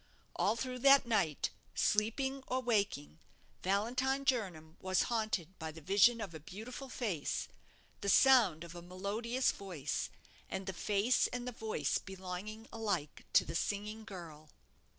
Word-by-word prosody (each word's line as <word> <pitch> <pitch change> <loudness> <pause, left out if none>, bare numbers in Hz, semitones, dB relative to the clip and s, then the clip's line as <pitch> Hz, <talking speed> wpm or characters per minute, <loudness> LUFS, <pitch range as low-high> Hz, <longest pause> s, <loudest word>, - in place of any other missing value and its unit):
All 215 - +2
through 250 +2 -3
that 275 +1 +7
night, 195 -11 +1 0.2
sleeping 265 +6 +1
or 255 - 0
waking, 200 - 0 0.4
Valentine 255 +8 +1
Jernam 180 -11 -1
was 185 0 +2
haunted 200 -6 -1
by 160 -1 -4
the 160 - -11
vision 200 +8 +5
of 195 -6 -5
a 160 - -7
beautiful 220 - -8
face, 200 - -2 0.5
the 200 - -1
sound 220 - +6
of 170 -1 -9
a 175 - -8
melodious 205 +8 -1
voice, 170 -8 -3 0.4
and 190 0 -4
the 190 - -3
face 210 +6 +2
and 245 0 -5
the - - -2
voice 225 -2 -1
belonged 190 +4 -7
alike 200 -10 -2
to - - +6
the - - -5
singing 210 +5 -2
girl. 165 -7 -10
205 Hz, 145 wpm, -34 LUFS, 180-235 Hz, 0.5 s, that